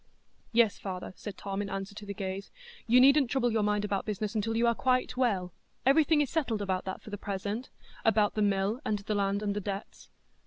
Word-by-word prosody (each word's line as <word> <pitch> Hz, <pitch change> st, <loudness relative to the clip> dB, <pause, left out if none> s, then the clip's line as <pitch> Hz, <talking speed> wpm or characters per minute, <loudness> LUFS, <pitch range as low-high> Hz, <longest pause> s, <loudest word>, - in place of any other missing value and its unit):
"Yes, 230 Hz, -3 st, +3 dB
father," 185 Hz, -2 st, -5 dB
said 205 Hz, -3 st, -8 dB
Tom, 195 Hz, 0 st, -3 dB
in 200 Hz, -, -4 dB
answer 195 Hz, +1 st, -4 dB
to 205 Hz, 0 st, -9 dB
the 200 Hz, -, -3 dB
gaze. 195 Hz, -1 st, -4 dB, 0.4 s
"You 240 Hz, +2 st, +6 dB
needn't 275 Hz, 0 st, +6 dB
trouble 245 Hz, -2 st, +1 dB
your 220 Hz, -1 st, +1 dB
mind 210 Hz, 0 st, +1 dB
about 200 Hz, -1 st, -1 dB
business 210 Hz, 0 st, -3 dB
until 225 Hz, +1 st, -1 dB
you 235 Hz, -, +3 dB
are 235 Hz, -, +4 dB
quite 255 Hz, +1 st, +1 dB
well; 200 Hz, -9 st, 0 dB, 0.3 s
everything 300 Hz, +3 st, +5 dB
is 285 Hz, -, 0 dB
settled 265 Hz, -9 st, 0 dB
about 190 Hz, -2 st, -1 dB
that 190 Hz, -, -5 dB
for 215 Hz, -, -10 dB
the 205 Hz, -, -5 dB
present,—about 205 Hz, +1 st, -1 dB
the 215 Hz, -, -1 dB
mill 200 Hz, +3 st, +1 dB
and 215 Hz, -, 0 dB
the 205 Hz, +1 st, -3 dB
land 200 Hz, 0 st, 0 dB
and 205 Hz, -1 st, -1 dB
the 205 Hz, -, -2 dB
debts." 200 Hz, +1 st, -6 dB
210 Hz, 210 wpm, -30 LUFS, 200-235 Hz, 0.4 s, You